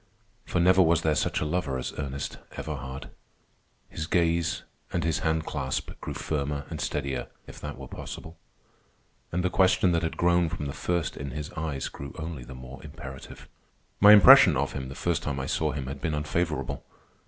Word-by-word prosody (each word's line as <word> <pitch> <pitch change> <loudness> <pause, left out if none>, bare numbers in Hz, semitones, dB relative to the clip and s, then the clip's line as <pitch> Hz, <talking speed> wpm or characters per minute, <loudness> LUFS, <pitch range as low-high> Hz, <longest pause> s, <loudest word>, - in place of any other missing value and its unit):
For 90 - -1
never 95 +2 +6
was 85 -1 +4
there 80 - +3
such - - 0
a - - 0
lover 75 -4 -1
as 65 - -4
Ernest 70 -1 -4
Everhard. 65 -3 -6 0.8
His 80 - -5
gaze 85 -1 +1 0.3
and - - 0
his 80 0 +1
hand 80 -2 0
clasp 65 -3 -3
grew - - -5
firmer 70 -2 -2
and - - -4
steadier, 70 -2 -2 0.2
if - - -11
that - - -6
were - - -8
possible; 80 +1 -8 1.0
and 90 +1 0
the 90 - +1
question 95 -1 +4
that 85 -1 +2
had 80 - -3
grown 85 -1 +3
from 75 - -4
the 70 - -4
first 85 +3 -1
in 70 0 -5
his 75 +3 -5
eyes, 80 -5 -3
grew 70 0 -8
only 80 -5 -5
the 65 +2 -10
more 65 +1 -10
imperative. 65 0 -10 0.5
My 105 +1 +9
impression 105 - +9
of 70 +2 -1
him, 65 -1 -5
the 70 - -8
first 85 -1 0
time 70 -2 -3
I 65 - -2
saw - - 0
him, 70 -2 -4
had 70 +1 -6
been 80 -3 -1
unfavorable. 75 +2 -2
75 Hz, 190 wpm, -27 LUFS, 70-85 Hz, 1.0 s, My